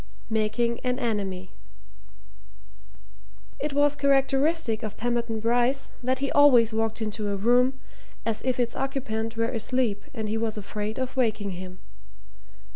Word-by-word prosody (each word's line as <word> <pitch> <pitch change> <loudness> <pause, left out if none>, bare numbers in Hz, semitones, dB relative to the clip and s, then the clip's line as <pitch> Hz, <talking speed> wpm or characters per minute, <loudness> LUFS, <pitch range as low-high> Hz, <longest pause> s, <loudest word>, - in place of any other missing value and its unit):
MAKING 230 +2 +1
AN 250 -1 -1
ENEMY 200 -7 -2 2.1
It 295 -1 -2
was 290 0 +3
characteristic 275 -2 +2
of 215 -2 -5
Pemberton 235 -1 -1
Bryce 245 +4 +1
that 260 +1 0
he 275 +1 -2
always 245 -6 +6
walked 225 0 -1
into 215 -1 -3
a 200 - 0
room 250 +5 +3 0.5
as 220 -1 -1
if 255 -1 -1
its 240 -1 0
occupant 225 -5 -3
were 230 0 +1
asleep 230 -3 -1
and 220 -6 -4
he 220 +1 -1
was 220 -1 -2
afraid 210 +1 -4
of 260 0 -3
waking 215 -5 0
him. 185 0 -8
230 Hz, 135 wpm, -26 LUFS, 215-260 Hz, 2.1 s, always